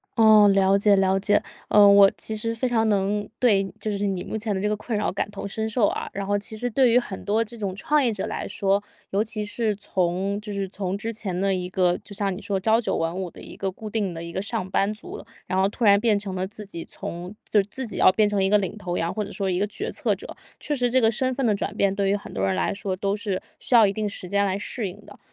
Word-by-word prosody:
哦， 215 Hz, -2 st, +7 dB
了 195 Hz, 0 st, +4 dB
解 205 Hz, 0 st, +4 dB
了 190 Hz, 0 st, +2 dB
解。 205 Hz, +1 st, +2 dB, 0.2 s
呃， 210 Hz, -1 st, +6 dB
我 200 Hz, -1 st, +8 dB
其 220 Hz, -, -4 dB
实 230 Hz, +2 st, -2 dB
非 250 Hz, +2 st, -1 dB
常 225 Hz, -2 st, +2 dB
能 205 Hz, 0 st, 0 dB
对 205 Hz, -6 st, +3 dB
就 215 Hz, -, -3 dB
是 205 Hz, 0 st, -1 dB
你 190 Hz, -2 st, -2 dB
目 -, -, -4 dB
前 215 Hz, -1 st, -2 dB
的 190 Hz, -, -2 dB
这 210 Hz, -, 0 dB
个 210 Hz, -, -1 dB
困 215 Hz, +1 st, -3 dB
扰 205 Hz, -, 0 dB
感 195 Hz, -, -2 dB
同 -, -, -7 dB
身 220 Hz, +2 st, -3 dB
受 220 Hz, -2 st, +2 dB
啊， -, -, -3 dB
然 200 Hz, -, -3 dB
后 205 Hz, +1 st, +1 dB
其 210 Hz, +2 st, -7 dB
实 245 Hz, +3 st, -2 dB
对 255 Hz, +2 st, +4 dB
于 235 Hz, -, +5 dB
很 205 Hz, -6 st, -3 dB
多 215 Hz, +3 st, +2 dB
这 230 Hz, +1 st, -11 dB
种 200 Hz, -4 st, -3 dB
创 300 Hz, +7 st, +2 dB
业 240 Hz, -4 st, +1 dB
者 195 Hz, -, -3 dB
来 -, -, -4 dB
说， 200 Hz, 0 st, +1 dB, 0.3 s
尤 200 Hz, -, +1 dB
其 215 Hz, -1 st, -3 dB
是 215 Hz, 0 st, -1 dB
从 190 Hz, 0 st, -1 dB
就 210 Hz, 0 st, -7 dB
是 195 Hz, -1 st, -3 dB
从 195 Hz, -1 st, -3 dB
之 225 Hz, +3 st, -4 dB
前 205 Hz, -5 st, -4 dB
的 195 Hz, +1 st, +1 dB
一 180 Hz, -1 st, -2 dB
个 180 Hz, -1 st, +2 dB
就 200 Hz, -, -10 dB
像 195 Hz, -1 st, -1 dB
你 185 Hz, -, -7 dB
说 200 Hz, -, -1 dB
朝 220 Hz, +4 st, +3 dB
九 240 Hz, -, -1 dB
晚 165 Hz, 0 st, -1 dB
五 185 Hz, 0 st, -4 dB
的 -, -, -14 dB
一 -, -, -11 dB
个 195 Hz, -, -2 dB
固 215 Hz, +3 st, -8 dB
定 205 Hz, -4 st, -1 dB
的 165 Hz, 0 st, -6 dB
一 170 Hz, -, -7 dB
个 185 Hz, -, -3 dB
上 205 Hz, -2 st, -3 dB
班 200 Hz, +2 st, +1 dB
族， 215 Hz, -, -8 dB, 0.3 s
然 185 Hz, +1 st, +1 dB
后 190 Hz, -, +4 dB
突 215 Hz, +4 st, -5 dB
然 200 Hz, -2 st, +6 dB
变 215 Hz, -1 st, +3 dB
成 200 Hz, -2 st, -5 dB
了 185 Hz, 0 st, -2 dB
自 210 Hz, +1 st, -9 dB
己 170 Hz, -4 st, -7 dB
从 175 Hz, +4 st, -7 dB
就 210 Hz, -, +4 dB
是 195 Hz, -, -9 dB
自 260 Hz, +4 st, -4 dB
己 215 Hz, -, -5 dB
要 -, -, +7 dB
变 215 Hz, +1 st, +3 dB
成 205 Hz, -1 st, 0 dB
一 190 Hz, -, +2 dB
个 210 Hz, -, +5 dB
领 200 Hz, 0 st, -3 dB
头 180 Hz, -4 st, -3 dB
羊， 165 Hz, -, -1 dB
或 210 Hz, -1 st, -2 dB
者 205 Hz, -, -9 dB
说 195 Hz, -2 st, -2 dB
一 180 Hz, -1 st, 0 dB
个 205 Hz, -, +1 dB
决 400 Hz, -, -5 dB
策 -, -, 0 dB
者。 -, -, -9 dB, 0.3 s
确 300 Hz, -, -2 dB
实 250 Hz, -3 st, +1 dB
这 260 Hz, +2 st, +3 dB
个 225 Hz, -1 st, +4 dB
身 255 Hz, +3 st, -1 dB
份 270 Hz, 0 st, -1 dB
的 220 Hz, -, +3 dB
转 200 Hz, 0 st, -3 dB
变， 200 Hz, -2 st, +2 dB
对 195 Hz, 0 st, 0 dB
于 200 Hz, -, +3 dB
很 205 Hz, -, -7 dB
多 95 Hz, -, -1 dB
人 95 Hz, -, +1 dB
来 -, -, 0 dB
说 195 Hz, -1 st, -3 dB
都 195 Hz, +1 st, -1 dB
是 200 Hz, -3 st, -3 dB, 0.2 s
需 250 Hz, -, +1 dB
要 225 Hz, -2 st, +8 dB
一 195 Hz, -, +2 dB
定 215 Hz, +1 st, -2 dB
时 190 Hz, -3 st, -7 dB
间 200 Hz, +1 st, +2 dB
来 190 Hz, -1 st, 0 dB
适 205 Hz, +2 st, -4 dB
应 200 Hz, +3 st, -10 dB
的。 -, -, -14 dB
205 Hz, 315 characters per minute, -24 LUFS, 195-220 Hz, 0.3 s, 我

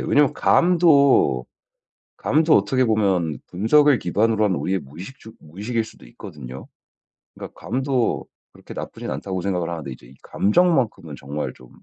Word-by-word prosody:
왜냐하면 145 Hz, -2 st, +2 dB
감도 145 Hz, -, +3 dB, 0.7 s
감도 155 Hz, +2 st, +3 dB
어떻게 130 Hz, -1 st, +2 dB
보면 95 Hz, -8 st, +1 dB
분석을 135 Hz, +8 st, +3 dB
기반으로 110 Hz, +4 st, +1 dB
한 95 Hz, -3 st, +1 dB
우리의 95 Hz, +2 st, -1 dB
무의식 90 Hz, -, -11 dB
주 110 Hz, -, -13 dB
무의식일 105 Hz, +9 st, -4 dB
수도 110 Hz, -, -15 dB
있거든요. 65 Hz, +1 st, -10 dB, 0.7 s
그러니까 -, -, -11 dB
감도 130 Hz, +1 st, -1 dB, 0.3 s
그렇게 -, -, -13 dB
나쁘진 -, -, -7 dB
않다고 95 Hz, -2 st, -4 dB
생각을 90 Hz, -2 st, -2 dB
하는데 80 Hz, -5 st, -6 dB
이제 60 Hz, 0 st, -13 dB
감정만큼은 110 Hz, -, +1 dB
정말 75 Hz, +2 st, -5 dB
좀 65 Hz, -1 st, -18 dB
105 Hz, 350 characters per minute, -22 LUFS, 80-130 Hz, 0.7 s, 감도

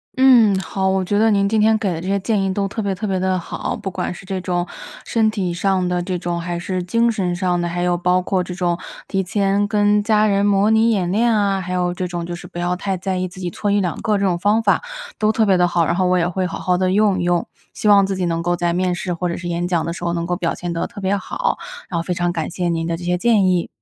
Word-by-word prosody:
嗯， 245 Hz, -7 st, +6 dB
好， 190 Hz, 0 st, -1 dB
我 190 Hz, 0 st, +1 dB
觉 205 Hz, +3 st, +1 dB
得 225 Hz, +1 st, +4 dB
您 200 Hz, -2 st, +2 dB
今 215 Hz, +1 st, +2 dB
天 220 Hz, 0 st, +4 dB
给 205 Hz, -3 st, -1 dB
的 165 Hz, -, -5 dB
这 180 Hz, -, -6 dB
些 200 Hz, +1 st, +1 dB
建 210 Hz, +1 st, 0 dB
议 195 Hz, 0 st, 0 dB
都 195 Hz, +1 st, -1 dB
特 220 Hz, +3 st, -4 dB
别 200 Hz, -2 st, -1 dB
特 200 Hz, -, -5 dB
别 190 Hz, -2 st, -1 dB
地 185 Hz, 0 st, +1 dB
好。 170 Hz, -, -4 dB
不 200 Hz, -3 st, -5 dB
管 185 Hz, -1 st, -3 dB
是 185 Hz, -, -12 dB
这 190 Hz, -1 st, -3 dB
种， 175 Hz, -1 st, -1 dB, 0.4 s
身 225 Hz, -2 st, +2 dB
体 190 Hz, -5 st, -2 dB
上 185 Hz, 0 st, 0 dB
的 180 Hz, 0 st, 0 dB
这 180 Hz, 0 st, -3 dB
种， 175 Hz, -1 st, -3 dB
还 175 Hz, 0 st, -3 dB
是 185 Hz, +1 st, -3 dB
精 230 Hz, +6 st, +1 dB
神 180 Hz, -5 st, -1 dB
上 180 Hz, -1 st, 0 dB
的， 175 Hz, -, -1 dB
还 175 Hz, +1 st, -2 dB
有 180 Hz, 0 st, +2 dB
包 180 Hz, +1 st, +2 dB
括 185 Hz, 0 st, 0 dB
这 180 Hz, 0 st, -7 dB
种， 175 Hz, -1 st, -1 dB, 0.3 s
提 195 Hz, -, 0 dB
前 200 Hz, +2 st, +1 dB
跟 205 Hz, 0 st, +2 dB
家 215 Hz, 0 st, +3 dB
人 200 Hz, -1 st, +2 dB
模 205 Hz, +1 st, +3 dB
拟 220 Hz, +1 st, +4 dB
演 185 Hz, -5 st, 0 dB
练 230 Hz, +4 st, +2 dB
啊， 200 Hz, -2 st, +1 dB
还 180 Hz, -, -6 dB
有 180 Hz, -1 st, 0 dB
这 180 Hz, 0 st, -3 dB
种 175 Hz, -1 st, -4 dB
就 175 Hz, -, -5 dB
是 -, -, -10 dB
不 -, -, -11 dB
要 175 Hz, +1 st, 0 dB
太 190 Hz, +1 st, -2 dB
在 185 Hz, +1 st, -2 dB
意 185 Hz, 0 st, -1 dB
自 180 Hz, +1 st, -12 dB
己 180 Hz, -2 st, -3 dB
错 205 Hz, -, -2 dB
一 205 Hz, 0 st, +3 dB
两 175 Hz, -5 st, -2 dB
个 215 Hz, -1 st, +1 dB
这 200 Hz, -, 0 dB
种 175 Hz, -2 st, +1 dB
方 210 Hz, +4 st, +2 dB
法， 200 Hz, -, +3 dB, 0.4 s
都 215 Hz, 0 st, +3 dB
特 220 Hz, 0 st, +2 dB
别 195 Hz, -2 st, +4 dB
地 180 Hz, -1 st, +3 dB
好。 170 Hz, -1 st, +1 dB
然 -, -, 0 dB
后 185 Hz, 0 st, +1 dB
我 180 Hz, 0 st, +3 dB
也 170 Hz, -1 st, +1 dB
会 185 Hz, +1 st, -1 dB
好 -, -, -5 dB
好 180 Hz, -1 st, +1 dB
地 185 Hz, 0 st, +1 dB
用 205 Hz, -2 st, +3 dB
一 175 Hz, -, -1 dB
用， 175 Hz, -1 st, +1 dB, 0.3 s
希 215 Hz, -, -2 dB
望 200 Hz, -1 st, +6 dB
自 195 Hz, -, -2 dB
己 185 Hz, -1 st, -1 dB
能 165 Hz, -1 st, -1 dB
够 175 Hz, +1 st, 0 dB
在 175 Hz, 0 st, 0 dB
面 180 Hz, 0 st, 0 dB
试 175 Hz, +1 st, -3 dB
或 175 Hz, +1 st, -2 dB
者 170 Hz, -, -3 dB
是 175 Hz, -, -6 dB
演 175 Hz, 0 st, -1 dB
讲 170 Hz, -3 st, 0 dB
的 170 Hz, -, -3 dB
时 175 Hz, -, -8 dB
候 170 Hz, 0 st, 0 dB
能 170 Hz, -1 st, -2 dB
够 175 Hz, +1 st, -1 dB
表 170 Hz, -2 st, -2 dB
现 175 Hz, -1 st, -4 dB
得 165 Hz, -, -2 dB
特 -, -, -10 dB
别 195 Hz, +1 st, 0 dB
好， 200 Hz, -, -2 dB, 0.3 s
然 170 Hz, -3 st, -1 dB
后 -, -, 0 dB
非 180 Hz, +1 st, -3 dB
常 175 Hz, 0 st, 0 dB
感 165 Hz, -3 st, -3 dB
谢 175 Hz, 0 st, -2 dB
您 165 Hz, -1 st, -1 dB
的 165 Hz, -, -2 dB
这 175 Hz, -, -9 dB
些 180 Hz, 0 st, 0 dB
建 220 Hz, -2 st, +3 dB
议。 180 Hz, -2 st, +1 dB
185 Hz, 320 characters per minute, -20 LUFS, 175-200 Hz, 0.4 s, 嗯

